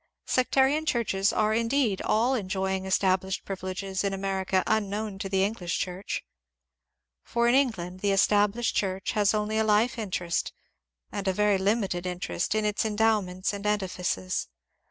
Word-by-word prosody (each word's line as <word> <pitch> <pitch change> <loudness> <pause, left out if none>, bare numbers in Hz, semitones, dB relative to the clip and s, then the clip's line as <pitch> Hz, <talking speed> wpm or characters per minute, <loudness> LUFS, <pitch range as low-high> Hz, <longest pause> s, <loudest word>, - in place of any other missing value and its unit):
Sectarian 270 +4 +2
churches 205 -6 +1
are 215 0 +1
indeed 230 -2 +1
all 235 +5 +2
en 205 -8 -2
joying 190 0 -1
established 190 0 +1
privileges 190 0 -4
in 195 -1 0
America 190 -1 0
unknown 210 -1 -1
to 195 -1 -4
the 190 0 +2
English 195 -4 -2
Church. 185 +2 -4 1.0
For 235 - 0
in 240 - +4
England 190 -10 0
the 205 - 0
Established 205 +3 +2
Church 190 -1 -1
has 210 -1 +2
only 215 +1 0
a - - +3
life 220 +3 +2
interest, 180 -5 -2 0.6
and 200 -1 -4
a 190 - +2
very 210 0 +2
limited 190 -3 0
interest, 180 +2 -2
in 215 0 +1
its 210 -1 0
endow 220 0 +2
ments 185 +2 -3
and 200 0 -5
edifices. 180 - -1
200 Hz, 155 wpm, -27 LUFS, 190-220 Hz, 1.0 s, in